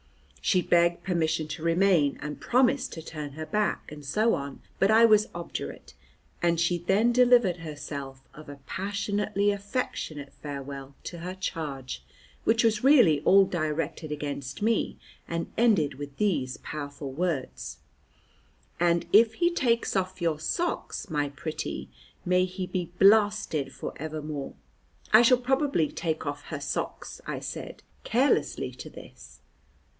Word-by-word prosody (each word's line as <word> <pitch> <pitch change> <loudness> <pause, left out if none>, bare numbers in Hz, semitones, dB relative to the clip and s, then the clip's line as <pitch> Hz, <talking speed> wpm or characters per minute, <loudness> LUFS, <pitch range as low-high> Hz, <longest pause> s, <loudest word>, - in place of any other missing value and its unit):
She 185 -2 +3
begged 170 0 +3
permission 160 -4 0
to 160 - -6
remain, 170 -4 +3
and 150 0 -6
promised 255 +2 +2
to 165 - -7
turn 150 -3 -6
her 155 +2 -6
back, 210 +4 -1
and 150 -1 -9
so 215 +12 +2
on, 140 0 -4 0.2
but 195 - +4
I 225 +1 +7
was 215 -2 +5
obdurate, 170 - -6 0.5
and 170 -1 +2
she 175 +1 +2
then 200 +7 +3
delivered 240 -7 +5
herself 140 -4 -7
of 155 -1 -12
a 140 0 -9
passionately 205 +2 -1
affectionate 200 - -4
farewell 140 -1 -7
to 175 - -7
her 180 +2 -5
charge, 145 - -5 0.4
which 225 +1 +3
was 220 -1 +2
really 240 - +6
all 195 +4 +6
directed 155 -2 -2
against 145 0 -4
me, 225 0 +1 0.3
and 170 0 -3
ended 205 -12 +3
with 140 +1 -8
these 150 -12 0
powerful 145 -2 -6
words: 130 - -3 1.0
"And 170 0 +2
if 225 +1 +6
he 345 0 +2
takes 235 -10 +1
off 185 -1 -1
your 165 -3 0
socks, 340 - -2
my 145 -2 0
pretty, 155 +2 -5 0.4
may 180 +1 +3
he 185 0 -5
be 180 -2 -3
blasted 195 -9 +4
for - - -6
evermore." 155 -2 -5 0.6
"I 215 - +10
shall 245 +1 +6
probably 265 - +1
take 160 -2 -3
off 145 0 -4
her - - -5
socks," - - -4
I - - -3
said - - -7 0.2
carelessly 260 +5 +1
to - - -9
this. - - -13
170 Hz, 140 wpm, -27 LUFS, 150-210 Hz, 1.0 s, I